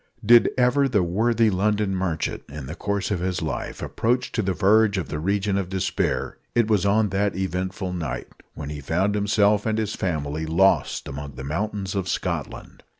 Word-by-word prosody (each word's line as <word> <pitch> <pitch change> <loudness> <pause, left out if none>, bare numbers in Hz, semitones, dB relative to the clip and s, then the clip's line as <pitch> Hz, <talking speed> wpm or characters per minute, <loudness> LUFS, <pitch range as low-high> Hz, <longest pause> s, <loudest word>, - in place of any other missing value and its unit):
Did 120 +2 +7
ever 130 +3 +3
the 105 -7 +2
worthy 110 +5 +2
London 100 +1 +1
merchant, 85 -4 -2
in 70 -1 -7
the 70 - -6
course 100 +3 -2
of 95 - 0
his 90 -1 -2
life, 80 - -4
approach 120 +3 0
to 110 - 0
the 95 -2 0
verge 105 +2 +3
of 90 - -3
the 75 - -3
region 100 +3 0
of 95 -2 -4
despair, 95 -5 -1 0.2
it 120 -2 +3
was 105 -3 +2
on 105 +1 +3
that 100 0 0
eventful 95 0 -3
night 75 -8 -4 0.3
when 75 -1 -6
he 75 -1 -6
found 90 +8 0
himself 105 0 +2
and 110 0 0
his 110 -1 -1
family 80 -3 -2
lost 95 +5 +2
among 70 0 -7
the 65 - -7
mountains 95 +6 -3
of 95 -2 -2
Scotland. - - -4
95 Hz, 185 wpm, -24 LUFS, 85-105 Hz, 0.3 s, Did